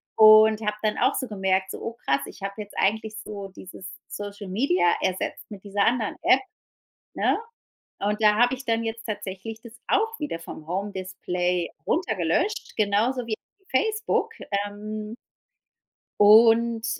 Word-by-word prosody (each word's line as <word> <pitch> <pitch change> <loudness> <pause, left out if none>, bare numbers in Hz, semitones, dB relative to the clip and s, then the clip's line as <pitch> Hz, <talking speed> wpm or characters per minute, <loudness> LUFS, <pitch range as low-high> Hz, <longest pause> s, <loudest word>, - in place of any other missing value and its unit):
Und 215 0 +7
hab 210 -1 -1
dann 215 -1 0
auch - - +3
so 260 - -2
gemerkt, 190 -2 0
so: - - -6
„Oh, 230 - -4
krass. 140 0 +2
Ich - - -12
hab 200 0 -4
jetzt 205 0 -8
eigentlich 220 +2 0
so 200 -2 -7
dieses 185 0 -11 0.2
Social 205 0 -7
Media 185 -5 +2
ersetzt 185 +4 -2
mit 200 -3 -10
dieser 200 0 0
anderen 230 -3 +1
App”, 265 - +5 0.7
ne? - - +2 0.6
Und 210 +2 -1
da 210 -1 +6
hab 240 +2 +4
ich 260 0 -5
dann 230 -1 0
jetzt 225 0 -5
tatsächlich 210 +1 -6
das 235 -1 -12
auch 450 +2 +1
wieder 225 - -3
vom 155 -2 -9
Home 195 +3 -2
Display 180 -2 -2 0.2
runter 320 - 0
gelöscht, 185 - -1
genauso 220 +5 +1
wie 220 - -1 0.4
Facebook. 440 - 0 0.4
Ähm 215 +2 -7 1.1
und, 225 +2 +6
215 Hz, 150 wpm, -25 LUFS, 195-230 Hz, 1.1 s, Und